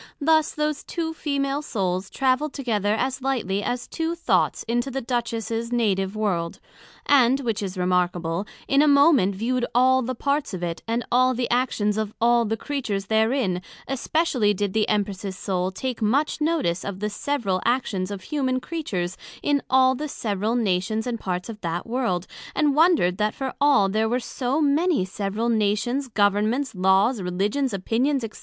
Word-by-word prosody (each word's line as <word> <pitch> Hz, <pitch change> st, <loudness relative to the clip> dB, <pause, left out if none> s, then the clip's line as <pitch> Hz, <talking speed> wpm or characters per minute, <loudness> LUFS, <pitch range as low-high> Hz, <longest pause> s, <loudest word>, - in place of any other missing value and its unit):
Thus 315 Hz, +1 st, +3 dB
those 300 Hz, -1 st, -2 dB
two 325 Hz, -1 st, -3 dB
Female 280 Hz, -2 st, -1 dB
Souls 190 Hz, -8 st, -2 dB
travelled 270 Hz, +2 st, 0 dB
together 215 Hz, -6 st, 0 dB
as 260 Hz, +3 st, -2 dB
lightly 235 Hz, -7 st, -1 dB
as 245 Hz, +4 st, -2 dB
two 330 Hz, 0 st, -2 dB
thoughts 335 Hz, -, +1 dB
into 240 Hz, +3 st, -1 dB
the 270 Hz, +1 st, -3 dB
Duchess 235 Hz, -3 st, -2 dB
her 230 Hz, 0 st, -1 dB
native 200 Hz, -4 st, 0 dB
World; 180 Hz, -6 st, -1 dB, 0.5 s
and, 270 Hz, -1 st, +4 dB
which 230 Hz, -5 st, -2 dB
is 190 Hz, -2 st, -4 dB
remarkable, 180 Hz, 0 st, 0 dB, 0.2 s
in 275 Hz, +1 st, +4 dB
a 305 Hz, -, +4 dB
moment 280 Hz, -, +5 dB
viewed 245 Hz, +5 st, -1 dB
all 260 Hz, +1 st, +5 dB
the 255 Hz, +1 st, -3 dB
parts 280 Hz, -3 st, -1 dB
of 180 Hz, -, -6 dB
it, 170 Hz, -1 st, -3 dB
and 230 Hz, +2 st, -1 dB
all 255 Hz, +1 st, +4 dB
the 245 Hz, 0 st, -1 dB
actions 220 Hz, -4 st, +1 dB
of 215 Hz, -1 st, -3 dB
all 235 Hz, 0 st, +4 dB
the 225 Hz, +1 st, -1 dB
Creatures 220 Hz, -7 st, -3 dB
therein, 220 Hz, -5 st, +1 dB, 0.3 s
especially 270 Hz, -6 st, +1 dB
did 200 Hz, 0 st, -2 dB
the 220 Hz, -1 st, +1 dB
Empress's 200 Hz, -2 st, -2 dB
Soul 185 Hz, -2 st, -1 dB
take 240 Hz, +6 st, -4 dB
much 275 Hz, +9 st, +1 dB
notice 300 Hz, -, 0 dB
of 200 Hz, -2 st, -5 dB
the 210 Hz, -, -1 dB
several 210 Hz, -4 st, -1 dB
actions 225 Hz, -6 st, 0 dB
of 200 Hz, -2 st, -6 dB
humane 260 Hz, +1 st, -1 dB
Creatures 205 Hz, -, -4 dB, 0.3 s
in 285 Hz, -1 st, +2 dB
all 260 Hz, 0 st, +5 dB
the 300 Hz, +4 st, -4 dB
several 215 Hz, -3 st, -2 dB
Nations 215 Hz, -1 st, 0 dB
and 240 Hz, -2 st, -3 dB
parts 180 Hz, -2 st, -3 dB
of 215 Hz, -2 st, -8 dB
that 170 Hz, 0 st, -3 dB
World, 230 Hz, -7 st, -1 dB, 0.3 s
and 295 Hz, -2 st, +3 dB
wonder'd 305 Hz, -, +3 dB
that 210 Hz, 0 st, 0 dB
for 265 Hz, -1 st, -4 dB
all 280 Hz, -9 st, +5 dB
there 220 Hz, +3 st, 0 dB
were 245 Hz, +2 st, +1 dB
so 255 Hz, +3 st, -2 dB
many 305 Hz, -, +2 dB
several 200 Hz, +4 st, -3 dB
Nations, 225 Hz, +5 st, 0 dB
Governments, 215 Hz, +5 st, +1 dB
Laws, 195 Hz, +5 st, +3 dB
Religions, 205 Hz, +9 st, -1 dB
Opinions, 240 Hz, +8 st, 0 dB
&c. -, -, -12 dB
230 Hz, 170 wpm, -24 LUFS, 195-270 Hz, 0.5 s, moment